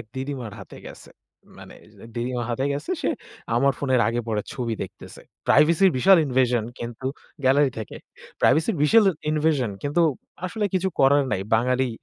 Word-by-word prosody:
এক - - -10
দিদিমার 130 -4 -5
হাতে - - -12
গেছে, - - -12 0.5
মানে - - -12 0.4
দিদিমা 120 +1 -2
হাতে 125 +3 -1
গেছে। 145 - -5
সে - - +1 0.5
আমার 135 +3 +3
ফোনের 130 -3 +1
আগে-পরে 115 -2 -2
ছবি 120 -6 -3
দেখতেছে। - - -11 0.2
প্রাইভেসির 170 +5 +5
বিশাল 190 +9 +6
invasion 125 -3 +1
কিন্তু 120 +2 -6 0.4
গ্যালারি 135 +1 +4
থেকে। 110 - -7 0.4
প্রাইভেসির 160 - +3
বিশাল 220 +8 +5 0.3
invasion 150 -6 +1
কিন্তু 145 +4 +1 0.4
আসলে 205 +4 -2
কিছু 190 0 +1
করার 140 +1 +5
নাই। 95 -2 -1
বাঙালি 125 +3 +1
130 Hz, 145 wpm, -24 LUFS, 120-150 Hz, 0.5 s, বিশাল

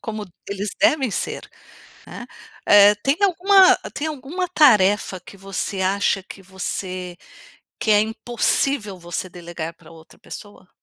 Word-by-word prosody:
como 215 -2 -6 0.2
eles 200 +1 -4
devem 270 -6 +2
ser. - - -4 0.6
Hã, - - -9 0.4
eh 205 0 +7
tem 275 +2 +2
alguma 385 0 +5 0.2
tem 300 - -3
alguma 310 +5 -4
tarefa 210 - +3
que 200 - -15
você 195 0 -4
acha 195 0 0
que 195 - -12
você 185 -1 -6 0.6
que 220 - 0
é 205 - +5
impossível 220 0 -1
você 175 +1 -5
delegar 170 -2 -8
pra 165 - -18
outra 160 -1 -17
pessoa? 205 -3 -12
205 Hz, 135 wpm, -21 LUFS, 185-270 Hz, 0.6 s, eh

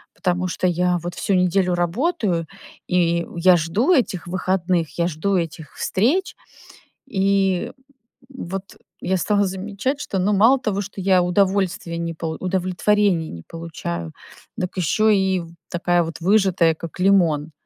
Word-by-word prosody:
потому 180 0 -1
что 185 0 -1
я 180 0 +1
вот 175 -1 -5
всю 200 - -1
неделю 180 0 +2
работаю, 180 - 0 0.4
и 170 -1 +1
я 180 +1 +6
жду 200 - +1
этих 195 - 0
выходных, 180 -2 -1
я 170 - +2
жду 180 +4 -1
этих 160 -3 -4
встреч. 280 - 0 0.8
И 195 -1 +1 0.6
вот 195 -7 -7 0.2
я 190 +1 0
стала 205 +3 +1
замечать, 200 +9 -3
что, 195 - -3
ну, 200 +3 +1
мало 230 +7 +5
того, 205 -4 -1
что 200 0 -7
я 185 -1 +4
удовольствия 185 -1 0
не 170 0 -3
полу 160 -1 -5
удовлетворения 185 -1 +1
не 85 -1 -9
получаю, 85 - -6 0.4
дак 185 +1 -4
еще 180 +5 +1
и 190 -1 +1
в 170 - -10 0.2
такая 175 0 +1
вот 165 0 -7
выжатая, 185 -4 +3
как 165 +2 -9
лимон. 170 -6 +3
185 Hz, 145 wpm, -21 LUFS, 170-200 Hz, 0.8 s, я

